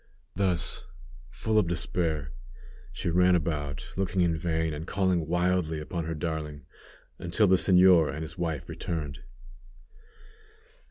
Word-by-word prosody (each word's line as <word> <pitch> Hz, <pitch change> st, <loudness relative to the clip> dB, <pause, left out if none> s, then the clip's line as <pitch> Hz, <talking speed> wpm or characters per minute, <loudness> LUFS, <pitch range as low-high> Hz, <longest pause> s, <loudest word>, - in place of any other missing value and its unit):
Thus, 90 Hz, -3 st, -1 dB, 0.4 s
full 110 Hz, -, 0 dB
of 90 Hz, -, +1 dB
despair, 80 Hz, -4 st, -1 dB, 0.6 s
she 85 Hz, -, -3 dB
ran 90 Hz, +1 st, +4 dB
about, 75 Hz, -4 st, -2 dB
looking 95 Hz, -1 st, 0 dB
in 85 Hz, -2 st, +2 dB
vain, 80 Hz, -1 st, -1 dB
and 75 Hz, +3 st, -6 dB
calling 95 Hz, -5 st, +1 dB
wildly 90 Hz, -2 st, +1 dB
upon 80 Hz, +2 st, -4 dB
her 80 Hz, 0 st, -3 dB
darling, 75 Hz, -2 st, -4 dB, 0.5 s
until 85 Hz, +5 st, +2 dB
the 95 Hz, -1 st, +5 dB
señor 90 Hz, -3 st, +5 dB
and 80 Hz, +1 st, -5 dB
his 80 Hz, -, -6 dB
wife 80 Hz, -6 st, -3 dB
returned. 75 Hz, -6 st, -4 dB
85 Hz, 125 wpm, -28 LUFS, 80-90 Hz, 0.6 s, the